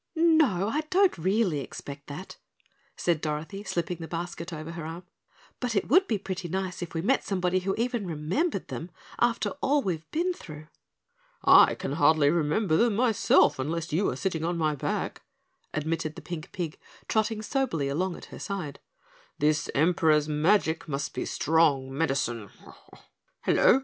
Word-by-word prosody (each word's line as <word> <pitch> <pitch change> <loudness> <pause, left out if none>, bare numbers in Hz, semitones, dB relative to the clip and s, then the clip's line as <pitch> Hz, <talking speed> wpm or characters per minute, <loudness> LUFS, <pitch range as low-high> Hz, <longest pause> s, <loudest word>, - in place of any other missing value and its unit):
"No, 315 - +4
I 290 +8 0
don't 380 +1 +4
really 190 -2 +1
expect 140 +1 -8
that," 150 +7 -8 0.6
said 170 -3 +1
Dorothy, 160 +6 -4
slipping 175 -3 -2
the 165 -1 -7
basket 170 0 -5
over 155 0 -6
her 170 -1 -6
arm, 165 +3 -6 0.6
"but 245 -3 -2
it 200 - 0
would 370 +8 +5
be 220 - +1
pretty 190 -2 -5
nice 185 +1 -3
if 175 -1 -6
we 165 - -1
met 265 +7 +2
somebody 185 -1 0
who 195 +1 -1
even 235 -3 -1
remembered 175 - -1
them, 165 - -5 0.3
after 235 -1 +1
all 285 +1 +2
we've 165 -4 -3
been 350 +3 0
through." 155 - -11 0.7
"I - - +7
can - - -4
hardly 145 0 +4
remember 160 +2 +1
them 230 0 +3
myself 225 - +4
unless 160 +4 -3
you 185 +6 +2
are - - -3
sitting 175 -5 -2
on 170 +1 -1
my 155 -2 +1
back," 145 - -3 0.5
admitted 155 0 -2
the - - -9
pink 170 -2 -6
pig, 170 -4 -4 0.3
trotting 220 0 0
soberly 220 - -1
along 175 +6 -1
at - - -10
her - - -8
side. 180 -8 -5 0.6
"This 150 0 +1
Emperor's 155 -1 +3
magic 160 +2 +2
must 140 -3 -3
be - - -3
strong 145 -5 +2
medicine. 135 -8 -1 0.9
Hello! 260 - +5
170 Hz, 160 wpm, -27 LUFS, 155-205 Hz, 0.9 s, I